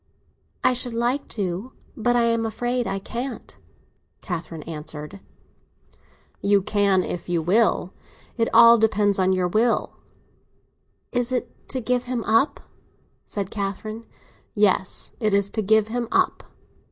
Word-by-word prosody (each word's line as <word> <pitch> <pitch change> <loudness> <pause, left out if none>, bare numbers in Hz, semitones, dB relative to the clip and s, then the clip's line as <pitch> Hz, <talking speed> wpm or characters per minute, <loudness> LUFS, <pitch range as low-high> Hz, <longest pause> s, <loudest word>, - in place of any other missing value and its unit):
"I - - +4
should 245 -1 -1
like 240 +4 0
to—but 215 +4 -3
I 240 - +3
am 230 -1 +1
afraid 240 +2 -1
I 195 - -2
can't," 240 +6 -6 0.7
Catherine 165 -3 -5
answered. 150 +2 -7 1.2
"You 200 -1 +3
can 200 -3 +2
if 175 0 -5
you 175 -1 +1
will. 195 0 +2 0.4
It 230 -1 +1
all 235 0 +8
depends 210 -2 +2
on 185 0 +3
your 185 -1 +1
will." 225 +6 +1 1.1
"Is 245 0 0
it 250 - -4
to 260 - -2
give 250 +1 0
him 245 -2 -2
up?" 225 +7 +2 0.7
said 200 -2 -4
Catherine. 215 +2 -5 0.5
"Yes, 200 -3 +2
it 215 -4 +2
is 200 0 +1
to 220 - -1
give 215 +1 +3
him 240 0 -2
up." - - +1
215 Hz, 130 wpm, -23 LUFS, 195-235 Hz, 1.2 s, all